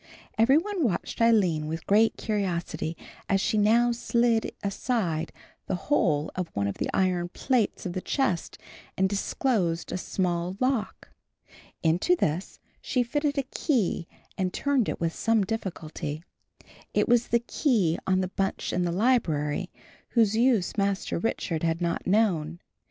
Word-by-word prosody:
Every 230 +6 +5
one 380 0 -1
watched 215 -1 -1
Aline 185 -10 +3
with 160 +1 -5
great 220 +3 +3
curiosity 170 -6 -2 0.3
as 195 - +3
she 215 - 0
now 235 +3 +4
slid 235 -1 +1
aside 195 -6 -1 0.4
the - - 0
whole 170 - +1
of 185 -2 -3
one 100 0 0
of 100 - -3
the - - -1
iron 180 -2 +1
plates 240 +2 0
of 180 - -3
the 185 - -3
chest 200 - -1 0.4
and 190 - +3
disclosed 195 -3 -1
a 180 - -2
small 180 0 -2
lock. 255 -4 -1 0.7
Into 175 - +3
this 170 - -2 0.2
she 250 -2 0
fitted 290 +4 -1
a 275 - +2
key 240 - -1 0.3
and 185 -1 0
turned 275 0 +1
it - - -3
with 165 -1 -1
some 225 -2 +2
difficulty. 165 -7 -4 0.7
It - - +3
was 240 -1 +3
the 235 - +3
key 230 - +1
on 190 0 +3
the 185 - -2
bunch 195 0 -2
in 180 0 +1
the 175 - 0
library, 180 - +1 0.5
whose 220 -2 +4
use 230 -5 +2
Master 200 -3 0
Richard 170 -6 -2
had 165 0 0
not 170 -1 -2
known. 175 -6 +1
195 Hz, 150 wpm, -27 LUFS, 170-235 Hz, 0.7 s, Every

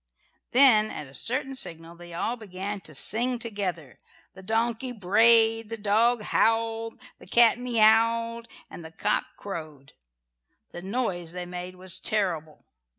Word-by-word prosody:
Then 240 -5 +6
at 150 - -7
a 135 - -16
certain 265 - -1
signal 165 -8 -6
they 175 0 -13
all 190 +8 -2
began 200 -2 -6
to 155 -3 -6
sing 240 - +2
together. 190 - -5 0.4
The 190 - -13
donkey 230 +5 -1
brayed, 225 +2 +3
the 230 - -5
dog 220 +3 +1
howled, 225 +1 0 0.2
the - - -16
cat 235 -1 +4
miaued, 230 0 +2 0.2
and 170 - -11
the 160 - -9
cock - - -1
crowed. 155 -8 -9 0.8
The 175 - -8
noise 190 -5 -3
they 180 0 -5
made 180 +1 -7
was 185 0 -1
terrible. 170 -9 -2
215 Hz, 140 wpm, -26 LUFS, 175-230 Hz, 0.8 s, Then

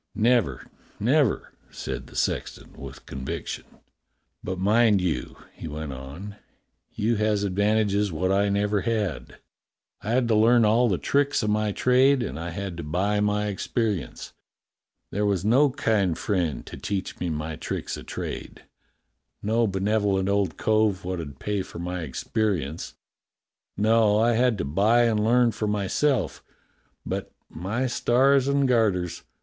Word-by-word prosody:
"Never, 115 - +2 0.3
never!" 130 +3 +1 0.2
said 65 0 -6
the - - -15
sexton - - -2
with 70 -1 -10
conviction. 65 0 -5 0.8
"But 95 0 -3
mind 105 +2 +4
you," 85 -9 -2 0.2
he - - -8
went 75 -2 -5
on, 75 +11 -9 0.5
"you 110 +2 0
has 105 -1 +1
advantages 100 +1 +1
wot 95 +4 -1
I 100 +1 +2
never 100 0 +1
had. 105 -8 -2 0.6
I 105 - -6
had 120 +1 +2
to 110 - +4
learn 115 +2 +5
all 115 +3 +4
the 95 - +1
tricks 140 +3 +1
o' - - 0
my 105 0 +1
trade, 130 +4 +3
and 75 - -5
I 85 +1 -4
had 95 0 -5
to 85 - -5
buy 95 +7 0
my 105 0 +1
experience. 105 - -3 0.8
There 105 - -1
was 100 -3 0
no 135 +7 +5
kind 105 - 0
friend 90 -7 -1
to - - -9
teach 100 -2 -4
me 90 - -2
my 75 0 -3
tricks - - -4
o' - - -8
trade, - - -6 0.8
no 115 +2 +2
benevo 100 +1 +1
lent 95 0 0
old 100 -3 0
cove 110 -4 +1
wot 90 -1 -3
'ud 70 -4 -7
pay 105 +5 -2
for 95 -1 -9
my 90 +1 -4
experience. 80 - -2 0.8
No, 110 0 +4
I 115 +2 +3
had 120 -1 +2
to 80 - -2
buy 105 +11 +3
and 110 -3 +2
learn 120 +1 +4
for 110 - -3
myself, 105 +4 0 0.6
but, - - -4 0.2
my 105 +10 -2
stars 130 +2 +3
and 140 -1 +2
garters! 105 -8 +1
105 Hz, 150 wpm, -25 LUFS, 90-115 Hz, 0.8 s, learn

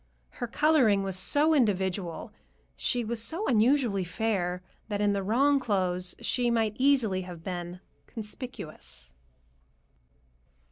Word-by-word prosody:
Her 240 - -5
coloring 240 -7 +3
was 190 -1 -1
so 290 +12 +4
individual, 190 - 0 0.4
she 240 - 0
was 230 +1 -2
so 330 - -2
unusually 235 -3 +2
fair, 180 -2 -2 0.2
that 205 -2 -3
in 205 0 +2
the 200 - -1
wrong 270 +8 +3
clothes 185 -6 -1
she 245 -1 0
might 225 -2 +1
easily 255 -9 +3
have 175 -3 -9
been 175 0 -5 0.3
"conspicuous." 155 - -8
210 Hz, 120 wpm, -28 LUFS, 185-245 Hz, 0.4 s, so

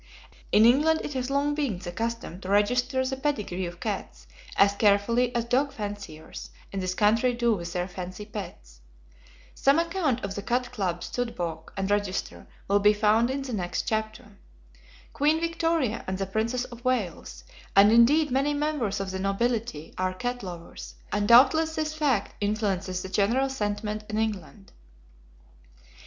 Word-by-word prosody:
In 215 - +6
England 300 +7 +4
it 295 - -5
has 255 -1 -2
long 285 +1 +1
been 280 -10 -1
the 175 -1 -7
custom 230 -3 -4
to 185 - -7
register 250 +6 +2
the 265 +1 -2
pedigree 210 -10 -2
of 175 0 -9
cats - - -5 0.3
as 200 0 +5
carefully 215 +4 +3
as 235 -1 0
dog 265 +4 +1
fanciers 205 -8 -7 0.2
in 195 - -3
this 185 0 -2
country 225 +4 +3
do 235 -1 +2
with 170 -4 -4
their 180 0 -1
fancy 185 +2 -7
pets. 170 - -9 0.7
Some 275 +2 +3
account 335 - 0
of 195 - -4
the 200 - -4
Cat 245 +3 -1
Club 185 -7 -2
Stud 245 -1 -3
Book 160 -2 -5
and 195 +1 -1
Register 205 -2 -2 0.2
will 200 +1 +3
be 210 +1 +5
found 215 +3 +3
in 270 +1 -2
the 260 -3 -5
next 180 -4 -2
chapter. 215 -1 -3 0.7
Queen 305 +3 +2
Victoria, 330 -7 0
and 190 0 -2
the 195 - -2
Princess 225 +5 -1
of 240 -1 -11
Wales, 195 - -2 0.3
and 200 +2 +7
indeed 270 +6 +5
many 275 +3 +1
members 285 -9 -1
of 195 -1 -3
the 190 - -4
nobility 200 -4 -1
are 185 0 0
cat 245 +4 -3
lovers, 170 - -9 0.2
and 205 0 0
doubtless 315 +7 +6
this 310 0 -2
fact 285 -9 0
influences 195 -3 -1
the - - -5
general 235 +8 +2
sentiment 210 -3 -3
in 215 - -2
England. 210 -2 -4
215 Hz, 165 wpm, -27 LUFS, 195-255 Hz, 0.7 s, and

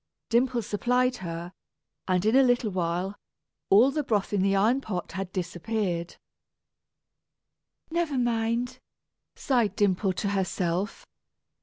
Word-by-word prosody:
Dimple 240 0 +2
supplied 250 +5 +1
her; 170 0 -6 0.5
and 185 0 +1
in 220 +3 +3
a 270 - +7
little 245 -4 +2
while, 180 +2 -1 0.5
all 230 +8 +6
the 300 +2 0
broth 210 -5 0
in 200 - +2
the 195 +1 +2
iron 225 +7 +3
pot 190 -8 -4
had 190 +1 -5
disappeared. 180 -1 -3 1.8
"Never 330 -4 0
mind," 240 +1 0 0.6
sighed 235 -7 +1
Dimple 195 -1 +2
to 200 +2 -2
herself. 190 0 -1
205 Hz, 120 wpm, -27 LUFS, 185-245 Hz, 1.8 s, a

